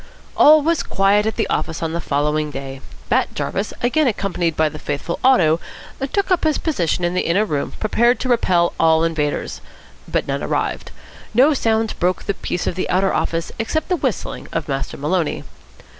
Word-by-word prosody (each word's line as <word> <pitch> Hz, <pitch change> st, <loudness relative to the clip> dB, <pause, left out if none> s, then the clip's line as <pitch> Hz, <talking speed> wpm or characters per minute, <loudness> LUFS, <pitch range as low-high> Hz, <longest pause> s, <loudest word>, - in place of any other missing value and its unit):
All 305 Hz, 0 st, +7 dB
was 330 Hz, +1 st, +1 dB
quiet 200 Hz, +2 st, +2 dB
at 220 Hz, -, -1 dB
the 225 Hz, -, 0 dB
office 160 Hz, 0 st, -2 dB
on 160 Hz, 0 st, -2 dB
the 170 Hz, -, -2 dB
following 150 Hz, +1 st, 0 dB
day. 135 Hz, -1 st, -7 dB, 0.3 s
Bat -, -, +1 dB
Jarvis, 200 Hz, +2 st, -2 dB
again 285 Hz, +5 st, +2 dB
accompanied 180 Hz, -7 st, -1 dB
by 155 Hz, -, +3 dB
the 155 Hz, 0 st, -7 dB
faithful 145 Hz, +5 st, -4 dB
Otto, 175 Hz, -12 st, +4 dB, 0.5 s
took 400 Hz, -1 st, 0 dB
up 365 Hz, -, +2 dB
his 310 Hz, -2 st, +2 dB
position 180 Hz, -, -1 dB
in 175 Hz, 0 st, +1 dB
the 185 Hz, -, +1 dB
inner 190 Hz, +6 st, +1 dB
room, 150 Hz, -7 st, -3 dB
prepared 235 Hz, +3 st, +2 dB
to 255 Hz, -, -2 dB
repel 180 Hz, -8 st, +2 dB
all 160 Hz, 0 st, +4 dB
invaders; 155 Hz, -3 st, -2 dB, 0.5 s
but -, -, -1 dB
none -, -, -2 dB
arrived. -, -, -2 dB, 0.5 s
No 275 Hz, +6 st, +5 dB
sounds 225 Hz, -4 st, 0 dB
broke 180 Hz, +1 st, -1 dB
the 200 Hz, -, -1 dB
peace 180 Hz, -, -4 dB
of -, -, -1 dB
the 185 Hz, -, -3 dB
outer 190 Hz, +1 st, +2 dB
office 165 Hz, 0 st, -1 dB
except 305 Hz, +10 st, -2 dB
the 365 Hz, -, +2 dB
whistling 265 Hz, -, -3 dB
of 165 Hz, -2 st, -3 dB
Master 135 Hz, -2 st, -3 dB
Maloney. 160 Hz, +3 st, -1 dB
185 Hz, 185 wpm, -20 LUFS, 160-235 Hz, 0.5 s, All